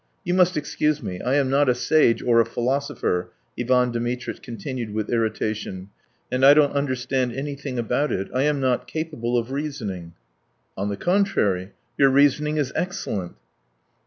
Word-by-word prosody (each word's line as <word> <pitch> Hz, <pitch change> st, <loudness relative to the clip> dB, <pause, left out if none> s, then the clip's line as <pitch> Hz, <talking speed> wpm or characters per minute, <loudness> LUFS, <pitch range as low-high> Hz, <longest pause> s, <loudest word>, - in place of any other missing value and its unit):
You 175 Hz, -2 st, -1 dB
must 180 Hz, -2 st, +3 dB
excuse 150 Hz, 0 st, 0 dB
me, 90 Hz, -1 st, -5 dB
I 130 Hz, +2 st, +1 dB
am 135 Hz, -2 st, +2 dB
not 140 Hz, 0 st, +3 dB
a 125 Hz, -, +3 dB
sage 125 Hz, -3 st, +3 dB
or 115 Hz, -1 st, +5 dB
a -, -, +1 dB
philosopher," 125 Hz, -6 st, -1 dB, 0.3 s
Ivan 125 Hz, 0 st, +2 dB
Dmitritch 120 Hz, +1 st, -3 dB
continued 120 Hz, -2 st, -6 dB
with 110 Hz, -1 st, -2 dB
irritation, 110 Hz, -4 st, -2 dB, 0.4 s
"and 125 Hz, +1 st, 0 dB
I 140 Hz, +2 st, +9 dB
don't 150 Hz, -2 st, +4 dB
understand 130 Hz, -2 st, -1 dB
anything 140 Hz, 0 st, -5 dB
about 125 Hz, +5 st, 0 dB
it. 95 Hz, -, -2 dB
I 130 Hz, -, +1 dB
am 150 Hz, 0 st, +1 dB
not 130 Hz, -2 st, 0 dB
capable 150 Hz, -7 st, -2 dB
of 120 Hz, +2 st, -2 dB
reasoning." 110 Hz, -, -4 dB, 0.6 s
"On 100 Hz, +2 st, -2 dB
the 100 Hz, -, -3 dB
contrary, 110 Hz, -, +1 dB, 0.3 s
your 135 Hz, -1 st, +6 dB
reasoning 145 Hz, +2 st, +3 dB
is 140 Hz, -3 st, -1 dB
excellent." 105 Hz, -, -3 dB
130 Hz, 160 wpm, -23 LUFS, 115-145 Hz, 0.6 s, I